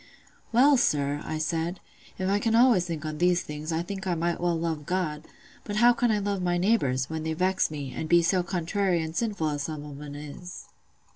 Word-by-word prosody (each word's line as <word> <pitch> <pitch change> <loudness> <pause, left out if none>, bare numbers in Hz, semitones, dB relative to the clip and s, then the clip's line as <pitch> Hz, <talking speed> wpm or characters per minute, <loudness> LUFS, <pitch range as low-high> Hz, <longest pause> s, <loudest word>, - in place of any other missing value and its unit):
"'Well, 270 +4 +6
sir,' 145 - +1
I 155 - -3
said, 165 +3 -2 0.4
'if 185 - -2
I 200 +1 +2
can 225 +1 +1
always 235 -7 +5
think 160 -3 -4
on 155 -1 -4
these 175 0 +3
things, 150 +2 -6
I 165 +1 0
think 190 +1 -6
I 175 - +1
might 170 +1 -1
well 175 -1 +1
love 160 -3 -3
God: 160 -4 -2 0.4
but 205 - -5
how 240 +3 +6
can 240 0 +1
I 215 - +2
love 200 -1 -1
my 175 -1 +1
neighbours, 140 - +1
when 160 0 -4
they 160 0 -2
vex 185 +3 +1
me, 145 -4 -6
and 160 - -4
be 170 0 +5
so 180 +2 +2
contrary 180 +1 0
and 160 +1 -6
sinful 205 -9 -1
as 145 -1 -3
some 150 0 -5
on 145 -1 -9
'em 145 -1 -8
is? 150 +5 -9
170 Hz, 220 wpm, -27 LUFS, 155-195 Hz, 0.4 s, Well